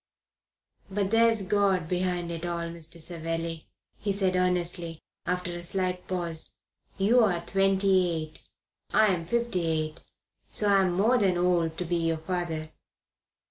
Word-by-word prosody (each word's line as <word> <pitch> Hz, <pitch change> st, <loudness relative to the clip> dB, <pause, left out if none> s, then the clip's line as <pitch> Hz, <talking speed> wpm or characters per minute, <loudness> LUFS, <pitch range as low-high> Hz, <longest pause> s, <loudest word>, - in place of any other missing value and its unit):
"But 195 Hz, 0 st, -1 dB
there's 225 Hz, -2 st, +4 dB
God 195 Hz, -4 st, +2 dB
behind 180 Hz, -1 st, -1 dB
it 165 Hz, 0 st, -5 dB
all. 170 Hz, -1 st, -2 dB
Mr. 170 Hz, 0 st, -7 dB
Savelli," 165 Hz, -1 st, -4 dB, 0.3 s
he 205 Hz, -, -1 dB
said 190 Hz, -2 st, +1 dB
earnestly, 175 Hz, -2 st, 0 dB, 0.3 s
after 180 Hz, 0 st, -1 dB
a 175 Hz, -, -5 dB
slight 180 Hz, +1 st, -2 dB
pause, 170 Hz, -3 st, -3 dB, 0.4 s
"you 215 Hz, +6 st, +4 dB
are 175 Hz, -5 st, +1 dB
twenty 195 Hz, -1 st, +3 dB
eight; 155 Hz, -2 st, -5 dB, 0.5 s
I 215 Hz, -3 st, +5 dB
am 170 Hz, -2 st, -3 dB
fifty 235 Hz, -4 st, 0 dB
eight; 155 Hz, 0 st, -1 dB, 0.5 s
so 210 Hz, -, +1 dB
I'm 195 Hz, -3 st, +4 dB
more 225 Hz, +7 st, +3 dB
than 190 Hz, -4 st, +2 dB
old 175 Hz, -1 st, +3 dB
enough 160 Hz, 0 st, -6 dB
to 180 Hz, -, -2 dB
be 175 Hz, +1 st, 0 dB
your 165 Hz, -1 st, 0 dB
father. 160 Hz, -2 st, -3 dB
180 Hz, 145 wpm, -28 LUFS, 165-195 Hz, 0.5 s, I